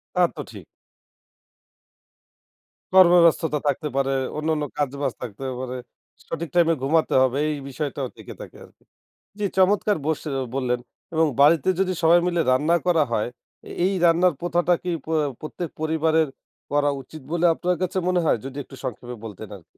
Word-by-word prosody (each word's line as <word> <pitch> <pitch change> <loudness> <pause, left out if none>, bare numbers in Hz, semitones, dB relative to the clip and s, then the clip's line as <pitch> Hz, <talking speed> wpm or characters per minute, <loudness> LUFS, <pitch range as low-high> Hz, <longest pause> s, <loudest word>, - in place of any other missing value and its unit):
তা 180 - +2 0.2
তো - - -5
ঠিক। 100 -5 -10 2.3
কর্মব্যস্ততা 170 -4 +5
থাকতে 145 +2 -1
পারে, 135 0 +1 0.3
অন্যান্য 155 -1 0
কাজ-বাজ 140 -1 -1
থাকতে 120 +1 -7 0.2
পারে। 130 0 -4 0.5
সঠিক 165 0 -4
টাইম 175 -2 +5
এ - - +2
ঘুমাতে 160 +3 +2
হবে, 130 +1 +1
এই - - -1
বিষয়টাও 140 -1 -4
থেকে - - -10
থাকে - - -10
আরকি। - - -21 0.6
জ্বি, 210 - -1
চমৎকার 200 +2 +3
বসে 155 0 -2 0.3
বললেন 125 -2 0 0.3
এবং 160 0 +3
বাড়িতে 155 +3 +5
যদি 190 -1 +1
সবাই 170 +2 +6
মিলে 175 -1 +1
রান্না 150 +6 +3
করা 165 -3 +4
হয়? 110 0 0 0.6
এই 195 - +1
রান্নার 170 +1 +4
প্রথাটা 175 0 +2
কি 180 - -2
প্র 160 - -3 0.3
প্রত্যেক 160 +2 -5
পরিবারের 160 0 +2 0.4
করা 145 0 +2
উচিত 155 +4 -12
বলে 175 0 +1
আপনার 180 +2 0
কাছে 185 +1 -1
মনে 180 -1 +2
হয়, - - +3
যদি 135 +1 -7
একটু 135 - -13
সংক্ষেপে 125 +1 -6
বলতেন 110 0 -8
আরকি? 90 - -19
160 Hz, 155 wpm, -23 LUFS, 135-175 Hz, 2.3 s, সবাই